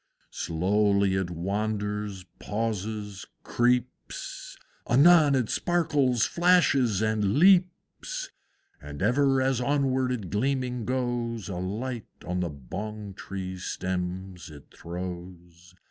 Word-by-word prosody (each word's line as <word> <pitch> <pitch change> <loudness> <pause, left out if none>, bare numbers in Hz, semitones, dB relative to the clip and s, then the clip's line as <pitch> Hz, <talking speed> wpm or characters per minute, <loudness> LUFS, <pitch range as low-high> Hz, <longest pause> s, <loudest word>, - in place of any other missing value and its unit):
Slowly 100 +3 +1
it 95 -2 -1
wanders, 105 +2 -3 0.2
pauses, 105 -2 -4 0.2
creeps, 125 +1 -2 0.3
Anon 145 +3 +6
it 125 -4 +1
sparkles, 150 -9 +1
flashes, 140 - +3
and 110 -2 +1
leaps; 180 +1 +2 0.5
And 75 +3 -6
ever 135 +4 +3
as 130 -2 +1
onward 130 -1 +1
it 105 -9 -4
gleaming 125 +1 -1
goes 120 -5 -2
A 90 - -4
light 110 +6 -4 0.2
on 90 +1 -2
the 90 -1 -1
Bong 100 - -7
tree 95 -1 -6
stems 90 -1 -4
it 75 -2 -14
throws. 90 0 -8
105 Hz, 100 wpm, -27 LUFS, 95-125 Hz, 0.5 s, Anon